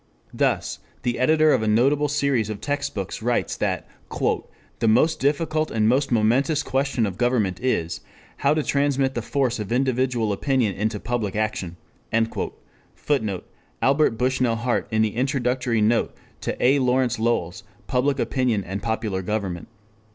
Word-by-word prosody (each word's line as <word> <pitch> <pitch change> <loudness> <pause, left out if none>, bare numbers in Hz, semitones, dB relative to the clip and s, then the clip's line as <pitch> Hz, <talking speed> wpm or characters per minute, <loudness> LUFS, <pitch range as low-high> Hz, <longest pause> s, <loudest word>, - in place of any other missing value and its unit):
Thus - - 0 0.2
the 120 0 -1
editor 155 +3 +4
of - - +2
a 110 - -1
notable 135 +7 +3
series 140 -6 +1
of 105 -2 -4
text 145 0 -2
books 100 0 -4
writes 120 +2 0
that - - -1 0.9
"the 115 - +1
most 125 +9 +3
difficult 155 +2 0
and 110 -1 +1
the - - +4
most 135 +3 +1
momentous 125 +7 +2
question 135 -3 0
of 95 -3 -5
government 115 -7 +1
(is) 85 -10 -1 0.4
how 140 +2 +2
to 155 - 0
transmit 140 -2 +1
the 120 - -2
force 125 0 0
of 105 -1 -5
individual 125 -3 +1
opinion 125 -1 +1
into 105 +1 -2
public 115 -4 -2
action." 105 -5 -2 1.2
[Footnote: 110 -10 -2 0.3
Albert 140 -4 +3
Bushnell 125 -1 +1
Hart 120 +2 -1
in 110 -1 +2
the 110 -1 -1
Introductory 125 -3 0
note 110 +2 +2 0.2
to - - -4
A. 135 +3 +4
Lawrence 125 -2 +1
Lowell's 100 -6 -1 0.2
_Public 135 +2 +1
Opinion 125 -6 0
and 95 +3 -5
Popular 110 -4 -2
Government. 95 -3 -3
120 Hz, 150 wpm, -23 LUFS, 110-135 Hz, 1.2 s, editor